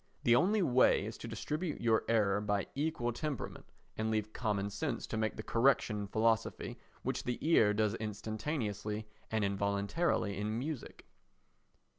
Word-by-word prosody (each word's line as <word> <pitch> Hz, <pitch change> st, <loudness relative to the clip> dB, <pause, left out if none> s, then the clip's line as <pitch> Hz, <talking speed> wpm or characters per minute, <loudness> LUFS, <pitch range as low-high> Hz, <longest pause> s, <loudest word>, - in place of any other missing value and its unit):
The 120 Hz, -, +6 dB
only 200 Hz, -, +3 dB
way 125 Hz, -, +4 dB
is 110 Hz, +1 st, -5 dB
to -, -, -6 dB
distribute 150 Hz, -, -3 dB
your 115 Hz, -1 st, +2 dB
error 105 Hz, -3 st, +3 dB
by 105 Hz, -2 st, 0 dB
equal 140 Hz, -5 st, -1 dB
temperament 145 Hz, 0 st, -4 dB, 0.3 s
and 110 Hz, 0 st, -1 dB
leave 110 Hz, -1 st, -1 dB
common 100 Hz, -4 st, -1 dB
sense 135 Hz, +1 st, -2 dB
to -, -, -5 dB
make 110 Hz, 0 st, 0 dB
the 110 Hz, -, -6 dB
correction 120 Hz, -2 st, +3 dB
in 100 Hz, -, -4 dB
philosophy 110 Hz, +2 st, 0 dB, 0.2 s
which -, -, -2 dB
the 125 Hz, -, -2 dB
ear 110 Hz, -11 st, +6 dB
does 105 Hz, 0 st, +1 dB
instantaneously 110 Hz, 0 st, -3 dB, 0.2 s
and 110 Hz, -1 st, 0 dB
involuntarily 100 Hz, -, 0 dB
in 105 Hz, +2 st, -1 dB
music. 145 Hz, +1 st, -5 dB
110 Hz, 150 wpm, -34 LUFS, 105-125 Hz, 0.3 s, The